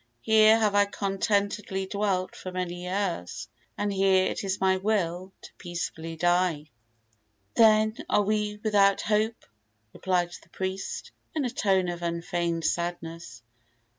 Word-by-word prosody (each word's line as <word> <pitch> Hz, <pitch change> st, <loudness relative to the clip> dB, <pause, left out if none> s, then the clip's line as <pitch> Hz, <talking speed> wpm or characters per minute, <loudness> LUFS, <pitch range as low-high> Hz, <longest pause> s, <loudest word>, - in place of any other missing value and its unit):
Here 220 Hz, 0 st, +6 dB
have 215 Hz, -2 st, +2 dB
I 205 Hz, 0 st, +5 dB
contentedly 200 Hz, 0 st, -1 dB
dwelt 190 Hz, -2 st, -1 dB
for 185 Hz, -, -7 dB
many 180 Hz, -1 st, -4 dB
years, 175 Hz, -, -3 dB, 0.3 s
and 205 Hz, -1 st, -1 dB
here 190 Hz, -1 st, +3 dB
it -, -, -4 dB
is 195 Hz, 0 st, -2 dB
my 190 Hz, 0 st, +3 dB
will 185 Hz, -2 st, -1 dB
to -, -, -12 dB
peacefully 165 Hz, -2 st, -5 dB
die." 175 Hz, -3 st, +1 dB, 0.8 s
"Then 215 Hz, -1 st, +5 dB
are 205 Hz, -, +3 dB
we 210 Hz, 0 st, -1 dB
without 200 Hz, -2 st, +4 dB
hope," 220 Hz, +2 st, 0 dB, 0.5 s
replied 180 Hz, -2 st, 0 dB
the -, -, -22 dB
priest, 190 Hz, 0 st, -4 dB, 0.2 s
in 295 Hz, -4 st, 0 dB
a 245 Hz, -, -2 dB
tone 195 Hz, -6 st, +1 dB
of 175 Hz, 0 st, -4 dB
unfeigned 170 Hz, -1 st, -2 dB
sadness. 165 Hz, -7 st, -3 dB
190 Hz, 135 wpm, -27 LUFS, 175-205 Hz, 0.8 s, Here